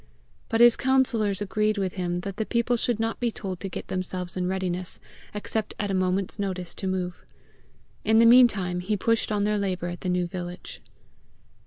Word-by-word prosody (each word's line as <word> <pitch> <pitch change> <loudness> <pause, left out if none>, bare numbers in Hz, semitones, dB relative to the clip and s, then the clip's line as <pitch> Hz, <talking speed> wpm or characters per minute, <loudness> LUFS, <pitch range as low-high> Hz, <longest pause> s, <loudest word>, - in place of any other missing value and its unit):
But 225 0 +2
his 240 -1 +8
councillors 235 -7 +1
agreed 215 +1 0
with 190 -2 -1
him 175 -1 -2
that 195 +1 -6
the 220 - -1
people 235 +1 +1
should 235 -1 0
not 225 0 -1
be 240 - +1
told 190 -5 -6
to 195 - -4
get - - -6
themselves 185 -1 -4
in 180 -1 -1
readiness 185 -1 -3 0.3
except 210 +1 -3
at 205 -1 -2
a - - -1
moment's 185 +2 0
notice 185 -3 -3
to 190 - -5
move. 180 -1 -3 0.8
In 220 +1 +3
the 230 - +7
meantime 220 -7 +5
he 205 +4 -1
pushed 230 +2 +1
on 205 -1 +1
their 210 0 +1
labour 185 -3 -2
at 175 - -7
the 185 - -2
new 180 0 +1
village. 175 0 -7
195 Hz, 190 wpm, -26 LUFS, 180-220 Hz, 0.8 s, his